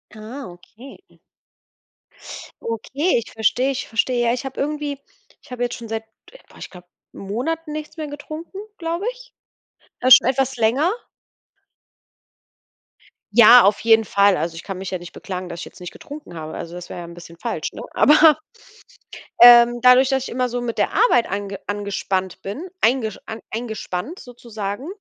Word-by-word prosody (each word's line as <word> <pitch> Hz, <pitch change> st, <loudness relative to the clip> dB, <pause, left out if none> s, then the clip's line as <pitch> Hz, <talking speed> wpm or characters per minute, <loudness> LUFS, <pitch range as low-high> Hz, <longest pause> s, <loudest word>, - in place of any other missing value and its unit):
Ah, 225 Hz, +6 st, -8 dB
okay. 215 Hz, +9 st, -15 dB, 1.6 s
Okay, 260 Hz, +9 st, -1 dB
ich -, -, -15 dB
verstehe, 245 Hz, +5 st, +1 dB
ich 265 Hz, -, -5 dB
verstehe. 240 Hz, +1 st, 0 dB
Ja 235 Hz, -, +2 dB
ich 250 Hz, +2 st, -4 dB
habe 270 Hz, -, -7 dB
irgendwie 295 Hz, -1 st, -3 dB, 0.4 s
ich -, -, -21 dB
habe 245 Hz, -1 st, -3 dB
jetzt 245 Hz, -, -2 dB
schon 235 Hz, -, -9 dB
seit 225 Hz, 0 st, -3 dB, 0.5 s
boah, -, -, -18 dB
ich -, -, -9 dB
glaube 180 Hz, -1 st, -15 dB, 0.2 s
Monaten 300 Hz, -, -4 dB
nichts 305 Hz, +1 st, -7 dB
mehr 310 Hz, -1 st, -4 dB
getrunken, 310 Hz, +5 st, -9 dB, 0.2 s
glaube 335 Hz, +2 st, -3 dB
ich. -, -, -17 dB, 0.7 s
Äh, 255 Hz, -, +1 dB
schon 245 Hz, -, +9 dB
etwas 265 Hz, 0 st, 0 dB
länger. 245 Hz, +9 st, +2 dB, 2.4 s
Ja, 235 Hz, +2 st, +8 dB
auf 205 Hz, +2 st, +2 dB
jeden 225 Hz, -1 st, +4 dB
Fall. 200 Hz, -1 st, +3 dB
Also, 165 Hz, 0 st, -3 dB
ich 165 Hz, -, -9 dB
kann 195 Hz, -, -6 dB
mich 190 Hz, 0 st, -6 dB
ja 185 Hz, -, -3 dB
nicht 175 Hz, 0 st, -11 dB
beklagen, 185 Hz, -2 st, -7 dB
dass 170 Hz, 0 st, -7 dB
jetzt -, -, -15 dB
nicht 180 Hz, -, -7 dB
getrunken 290 Hz, -, -11 dB
habe. 155 Hz, -1 st, -7 dB
Also, 170 Hz, -, -7 dB
das 180 Hz, 0 st, -9 dB
wäre -, -, -7 dB
ja 175 Hz, -, -7 dB
ein 170 Hz, -, -11 dB
bisschen 170 Hz, -1 st, -13 dB
falsch, -, -, -4 dB
ne? -, -, -8 dB
Aber, 305 Hz, 0 st, +6 dB, 1.0 s
ähm, 240 Hz, 0 st, +8 dB
dadurch, 255 Hz, +1 st, +6 dB
dass 265 Hz, -1 st, 0 dB
ich -, -, -6 dB
immer 250 Hz, +1 st, -1 dB
so 245 Hz, 0 st, -4 dB
mit 235 Hz, -1 st, -4 dB
der -, -, +1 dB
Arbeit 245 Hz, -, +3 dB
ange 200 Hz, 0 st, -4 dB
angespannt 195 Hz, -2 st, -3 dB
bin, 220 Hz, -, -6 dB
eingesch 225 Hz, -3 st, +1 dB
an 220 Hz, -, -7 dB
eingespannt 225 Hz, -, -5 dB
sozusagen 230 Hz, -1 st, -7 dB
235 Hz, 170 wpm, -21 LUFS, 200-270 Hz, 2.4 s, schon